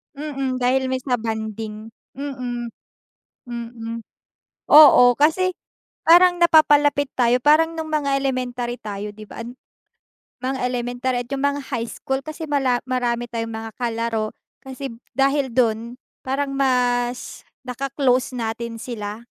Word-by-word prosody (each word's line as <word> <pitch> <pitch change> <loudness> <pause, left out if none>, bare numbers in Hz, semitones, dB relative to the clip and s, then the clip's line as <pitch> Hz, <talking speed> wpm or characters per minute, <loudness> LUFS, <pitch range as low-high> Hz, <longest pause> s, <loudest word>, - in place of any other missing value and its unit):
Mm, 275 -3 -3
dahil 260 +1 +1
may 260 - 0
sa 255 -1 0
bonding. 220 -1 -5 0.3
Mm. 250 -3 -4 0.8
Mm. 230 -1 -6 0.7
Oo, 275 -5 +9
kasi 345 +5 +3 0.5
parang 355 +2 +6
napapalapit 290 -4 +4
tayo. 245 0 +3
Parang 325 +2 +4
nung 320 -1 -5
mga 285 -3 +1
elementary 250 -2 -2
tayo 205 0 -5
'di 215 0 -11
ba 230 - -8
an 240 +2 -9 0.9
mga 265 +1 -2
elementary 245 +1 -2
at - - -22
yung 275 0 -2
mga 285 0 +1
high 235 -2 -1
school 265 +3 -3
kasi 315 +1 -6
mala 260 -4 +1
marami 240 -2 -1
tayong 230 -1 -3
mga 225 0 -6
kalaro 230 -2 -2 0.3
kasi 265 0 -7 0.3
dahil 275 0 +2
do'n 230 -1 +1 0.3
parang 275 +2 -1
mas 250 -2 0 0.2
naka-close 255 0 0
natin 230 0 -4
sila 215 -2 -6
250 Hz, 125 wpm, -22 LUFS, 235-275 Hz, 0.9 s, Oo